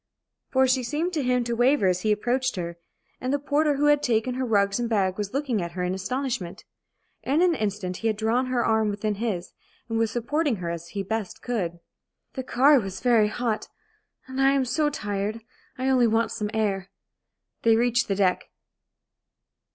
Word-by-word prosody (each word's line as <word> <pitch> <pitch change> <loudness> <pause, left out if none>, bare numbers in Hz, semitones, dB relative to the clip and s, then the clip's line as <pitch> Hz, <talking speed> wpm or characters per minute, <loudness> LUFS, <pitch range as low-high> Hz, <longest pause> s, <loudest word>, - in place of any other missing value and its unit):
For 265 0 +3
she 255 0 +2
seemed 305 +8 -2
to 310 - 0
him 250 -1 +1
to 235 0 -2
waver 250 0 +3
as 180 -1 +2
he 215 - +1
approached 245 +4 0
her, 170 -2 -5 0.4
and 255 - -2
the 285 - +2
porter 290 +1 +1
who 290 +2 +1
had 295 0 +4
taken 235 0 +1
her 260 +1 -2
rugs 200 -2 +2
and 240 -1 -1
bag 195 -4 +1
was 205 -1 -4
looking 265 -6 -1
at 170 0 -5
her 180 0 -3
in 180 +1 -1
astonishment. 240 -1 -3 0.6
In 285 +4 +1
an 360 -2 +4
instant 200 - -2
he 225 - -2
had 215 -2 0
drawn 230 +4 +1
her 250 -2 0
arm 220 -1 +2
within 210 +1 -1
his, 200 -4 -3 0.3
and 225 -1 -1
was 225 -1 +2
supporting 255 +4 0
her 175 -3 -4
as 170 0 -6
he 195 +3 -4
best 220 0 -4
could, 175 -9 -3 0.5
"The 265 - -3
car 270 +3 +4
was 195 -3 -5
very 235 -4 +4
hot, 225 0 -2 0.6
and 260 +1 -3
I 270 0 +5
am 275 -2 +2
so 295 +5 +1
tired. 205 -3 -3 0.4
I 260 +1 -2
only 255 -3 +4
want 225 +1 +1
some 210 -2 -3
air." 195 -4 -1 0.7
They 225 -1 +4
reached 240 +1 +2
the 195 - 0
deck. 190 -2 +1
230 Hz, 195 wpm, -25 LUFS, 200-260 Hz, 0.7 s, I